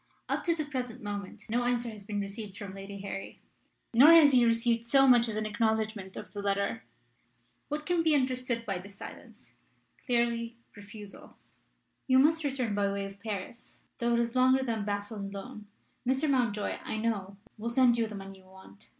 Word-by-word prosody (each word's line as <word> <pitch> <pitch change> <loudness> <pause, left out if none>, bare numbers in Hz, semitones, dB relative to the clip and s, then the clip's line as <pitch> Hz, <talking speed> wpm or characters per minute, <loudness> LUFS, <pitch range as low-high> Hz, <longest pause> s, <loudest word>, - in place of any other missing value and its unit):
Up - - -1
to 335 -2 +2
the 310 -2 -3
present 255 -6 -5
moment 205 -2 -6
no 240 +2 0
answer 240 -1 0
has 210 -2 -11
been 205 0 -3
received 200 0 -7
from 200 -2 -7
Lady 195 0 -8
Harry. 195 0 -6 0.5
Nor 280 +8 +9
has 315 -4 +8
he 250 -2 +5
received 230 0 +2
so 270 +2 +5
much 240 -2 +6
as 220 - -2
an 215 0 -1
acknowledgment 220 -2 -1
of - - -8
the 205 - -5
letter. 200 +3 -1 0.9
What 300 +1 -3
can 350 -2 +2
be 320 -2 +3
understood 255 -3 -1
by 195 -4 -2
this 200 +2 -12
silence? - - -12 0.5
Clearly, 235 -1 0 0.2
refusal. 205 0 -12 0.7
"You 260 -1 +5
must 315 +4 +4
return 260 -6 -1
by 200 -1 +1
way 200 0 -3
of 195 0 -10
Paris, 215 +3 -7 0.2
though 235 0 +2
it - - +2
is 235 +1 -3
longer 260 +1 +4
than 230 -3 -2
by 205 0 -1
Basle 205 +1 -7
and 200 0 -5
Laon. 210 +2 -8 0.4
Mr. 265 +4 +2
Mountjoy, 240 -7 0
I - - -3
know, 205 -3 -2 0.2
will 230 +2 -2
send 245 0 +4
you 225 - +1
the 215 - -8
money 195 -1 -9
you 190 - -21
want. 190 - -15
225 Hz, 195 wpm, -30 LUFS, 200-250 Hz, 0.9 s, Nor